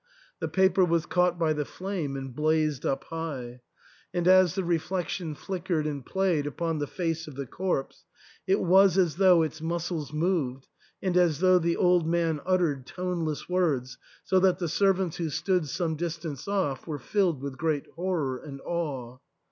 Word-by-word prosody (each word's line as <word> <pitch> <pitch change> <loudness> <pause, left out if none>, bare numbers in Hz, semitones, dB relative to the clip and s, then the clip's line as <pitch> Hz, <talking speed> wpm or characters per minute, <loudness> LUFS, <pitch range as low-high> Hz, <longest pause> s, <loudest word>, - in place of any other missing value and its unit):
The - - -2
paper 190 0 +3
was 170 -2 +2
caught 180 0 +2
by 160 -2 +2
the 150 -1 -1
flame 180 -4 -4
and 135 -2 -7
blazed 155 -2 +1
up 135 - -1
high; 135 -7 -6 0.5
and 175 0 -1
as 185 -2 +6
the 190 - -1
reflection 175 -1 -2
flickered 175 -3 -2
and 145 -3 -3
played 180 -4 0
upon 165 +2 -2
the 145 - -2
face 165 -1 -3
of 150 - -9
the 140 0 -4
corpse, 175 0 -3 0.4
it 195 +2 +3
was 190 +1 +5
as 175 -4 +2
though 185 -4 +6
its 155 0 -4
muscles 165 -2 -3
moved 150 -5 -1 0.4
and 185 -2 0
as 175 -5 +4
though 185 0 +5
the 170 0 0
old 180 -3 +3
man 165 -3 +1
uttered 165 -8 +1
toneless 175 -4 -3
words, 155 -9 0 0.2
so 190 - +3
that 185 -1 +3
the 175 - -2
servants 190 0 +1
who 165 -2 -2
stood 165 +2 0
some 160 +3 -1
distance 165 -3 -5
off 185 -10 -1
were 155 -2 -3
filled 175 - 0
with 140 -2 -6
great 155 -3 0
horror 165 -7 -1
and 140 0 -9
awe. 135 -8 -4
165 Hz, 170 wpm, -27 LUFS, 150-180 Hz, 0.5 s, as